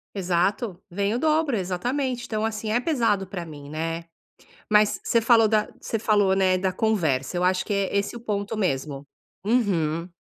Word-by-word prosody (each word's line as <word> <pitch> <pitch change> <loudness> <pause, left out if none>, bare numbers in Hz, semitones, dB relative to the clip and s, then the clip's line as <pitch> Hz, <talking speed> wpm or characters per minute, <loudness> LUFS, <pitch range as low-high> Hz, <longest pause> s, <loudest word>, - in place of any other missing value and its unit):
Exato, 185 +2 0
vem 200 +3 -1
o 240 - -1
dobro. 310 -2 +2
Exatamente. 240 +8 -2
Então, 215 -1 -2
assim, 215 -1 -3
é 235 - +3
pesado 230 - +1
pra 180 -2 -5
mim, 145 -3 -10
né, 165 +2 -3 0.6
mas 210 0 +4
você 230 - +2
falou 225 -1 +5
da 215 0 +2
você 225 - -3
falou, 205 -3 +3
né, 185 -1 +3
da 190 0 0
conversa. 175 -8 0
Eu 180 - 0
acho 185 0 +2
que 205 - -2
é 200 0 -1
esse 200 +3 0
o - - -6
ponto 210 -2 -3
mesmo. 140 -6 -2 0.4
Uhum. 175 -8 +1
200 Hz, 175 wpm, -25 LUFS, 180-225 Hz, 0.6 s, falou